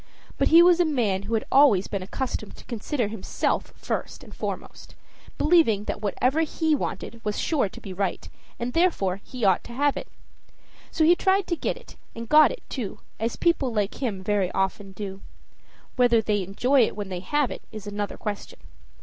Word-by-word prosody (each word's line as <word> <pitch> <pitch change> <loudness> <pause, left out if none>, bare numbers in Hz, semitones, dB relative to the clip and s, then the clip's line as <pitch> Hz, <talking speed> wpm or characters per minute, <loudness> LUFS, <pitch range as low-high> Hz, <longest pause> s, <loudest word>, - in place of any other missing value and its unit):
But - - +3
he 335 +2 +8
was 355 0 +5
a - - +6
man 235 - 0
who 215 +3 -2
had 220 - -1
always 265 -9 +6
been 200 - -3
accustomed 215 +2 -4
to - - -15
consider 235 +1 -2
himself 215 -3 -2
first - - -4
and - - -13
foremost, - - -6 0.4
believing 300 - +4
that 210 - -4
whatever 255 +9 +1
he 320 0 0
wanted 235 -4 -3
was 210 -1 -2
sure 285 -11 +1
to - - -12
be 190 - -8
right, 195 0 -2 0.3
and 240 +1 -3
therefore 200 - +1
he 250 -4 -4
ought 190 -2 +3
to 235 - -9
have 285 +3 +2
it. - - -6 0.8
So 320 - 0
he 340 +3 +6
tried 385 +1 +2
to 345 - -1
get - - -2
it, - - -15 0.2
and 230 0 -6
got 305 +4 +7
it - - -8
too, 230 -8 -5 0.2
as 225 +2 -1
people 335 -7 +1
like 210 0 -2
him 205 -8 -2
very 200 -2 +1
often 195 +1 -1
do. 195 -1 -7 0.8
Whether 245 -2 +5
they 210 -2 0
enjoy 245 +9 +2
it - - -7
when 205 -2 -5
they 180 -1 -4
have 285 +8 0
it - - -6
is 215 -2 -8
another 205 0 -4
question. 210 -2 -5
225 Hz, 190 wpm, -25 LUFS, 200-295 Hz, 0.8 s, he